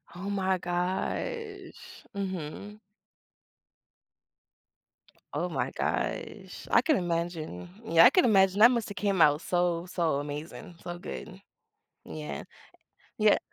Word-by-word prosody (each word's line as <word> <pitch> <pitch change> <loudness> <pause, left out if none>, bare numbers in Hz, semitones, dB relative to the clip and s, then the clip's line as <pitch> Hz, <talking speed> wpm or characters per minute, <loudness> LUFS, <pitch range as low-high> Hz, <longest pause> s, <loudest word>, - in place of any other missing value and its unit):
Oh 195 +3 -5
my 190 -2 +1
gosh. 190 - -4
Mhm. 195 +2 -5 2.5
Oh - - -1
my - - -1
gosh. - - -3
I - - +6
can 310 -5 +2
imagine. 165 - -3 0.2
Yeah, 165 +4 +7
I - - +10
can 365 +6 +4
imagine. 195 -3 +4
That 235 +3 +9
must 235 -3 -1
have 205 - -7
came 195 -3 +1
out 150 0 +5
so, 175 -1 0
so 165 -5 0
amazing, 150 +4 -7
so 175 0 -5
good. 190 +2 -8 0.6
Yeah. 75 -3 -6 0.7
Yeah - - +5
180 Hz, 115 wpm, -29 LUFS, 165-200 Hz, 2.5 s, I